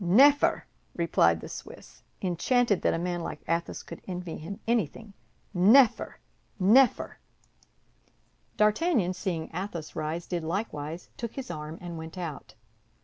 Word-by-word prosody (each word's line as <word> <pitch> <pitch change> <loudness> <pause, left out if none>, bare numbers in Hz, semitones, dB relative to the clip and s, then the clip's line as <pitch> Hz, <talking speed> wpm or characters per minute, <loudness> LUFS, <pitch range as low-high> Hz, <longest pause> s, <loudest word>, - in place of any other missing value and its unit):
"Neffer," 270 +11 +5 0.3
replied 85 - +3
the - - -7
Swiss, - - -10 0.2
enchanted 200 +4 +2
that - - +2
a - - -1
man 175 0 -2
like 150 - -6
Athos 170 +1 -2
could - - -10
envy 180 -2 -5
him 195 +6 -7
anything. 220 -2 -1 0.4
"Neffer, 220 +8 +5 0.4
neffer!" 230 +7 +4 1.4
D'Artagnan, 215 - +2
seeing 180 -4 -3
Athos 175 -3 -5
rise, 155 +2 -3
did 175 -2 -3
likewise, 165 -3 -4
took 235 -2 -5
his 270 -2 -5
arm, 150 +1 -6
and 170 -2 -6
went 160 +3 -8
out. 150 -10 -6
180 Hz, 130 wpm, -28 LUFS, 165-215 Hz, 1.4 s, Neffer